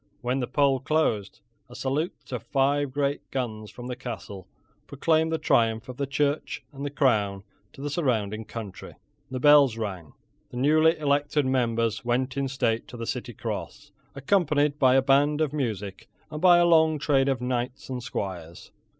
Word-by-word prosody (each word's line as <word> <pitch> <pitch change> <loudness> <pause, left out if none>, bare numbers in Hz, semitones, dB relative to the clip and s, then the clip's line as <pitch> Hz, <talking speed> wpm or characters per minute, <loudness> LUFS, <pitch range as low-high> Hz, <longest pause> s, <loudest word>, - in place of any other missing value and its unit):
When 125 +2 -1
the 125 - -2
poll 135 0 +2
closed, 125 -9 -1 0.3
a 125 - -12
salute 135 +1 -3
of 125 -4 -3
five 140 +3 +1
great 140 +1 -2
guns 110 -5 -4
from 120 +5 -10
the 125 0 -4
castle 110 -6 -8 0.4
proclaimed 160 +3 +1
the 160 - +1
triumph 115 -5 +1
of 125 - -7
the 140 - -2
Church 145 +2 -1
and 140 0 -7
the 145 - -2
Crown 105 -9 +1 0.3
to - - -12
the 145 - -3
surrounding 110 - -1
country. 105 -5 -8 0.3
The 130 -1 -4
bells 140 -4 +6
rang. 95 -8 -5 0.4
The 125 - -8
newly 155 +5 +4
elected 145 0 +1
members 115 -4 0
went 125 +2 -1
in 140 -1 -1
state 120 -4 -1
to 120 - -10
the 115 - -5
City - - -4
Cross, - - -6 0.2
accompanied 150 -1 +1
by 130 -2 +5
a 135 - +4
band 145 +3 +3
of 155 -2 0
music, 105 -9 -4 0.2
and 150 0 -6
by 175 -1 +7
a 175 - +4
long 160 -2 +4
train 140 -2 +2
of 135 -3 +1
knights 125 +1 -3
and 130 -2 -4
squires. 90 -8 -6
130 Hz, 175 wpm, -26 LUFS, 115-145 Hz, 0.4 s, by